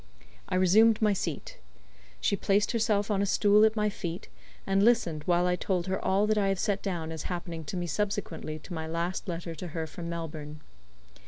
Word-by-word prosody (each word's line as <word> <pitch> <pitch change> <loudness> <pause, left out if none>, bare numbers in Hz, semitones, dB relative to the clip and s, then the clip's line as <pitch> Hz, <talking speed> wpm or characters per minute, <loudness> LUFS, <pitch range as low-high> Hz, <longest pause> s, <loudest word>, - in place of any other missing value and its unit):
I - - -1
resumed 210 +5 +5
my 210 -2 +3
seat. 165 -6 -4 0.6
She - - +1
placed 205 +1 +1
herself 215 -3 +1
on 200 -1 +1
a - - +2
stool 205 +1 +4
at 220 0 +2
my 210 -1 +1
feet, 170 - -5 0.4
and 195 0 +2
listened 205 -9 +3
while 175 0 +3
I 180 0 +2
told 180 -1 -1
her 190 0 -2
all 195 +2 +2
that 215 0 +2
I 200 - +2
have 195 0 +1
set 200 +2 0
down 170 -5 -3
as 160 -2 -6
happening 170 -2 -4
to 185 - -4
me 175 - -2
subsequently 180 -5 -3
to 165 +4 -10
my 160 -1 -4
last 170 +5 -3
letter 170 -1 -4
to 170 +3 -7
her 160 - -1
from 170 +2 -7
Melbourne. 155 -3 -6
180 Hz, 200 wpm, -29 LUFS, 165-205 Hz, 0.6 s, resumed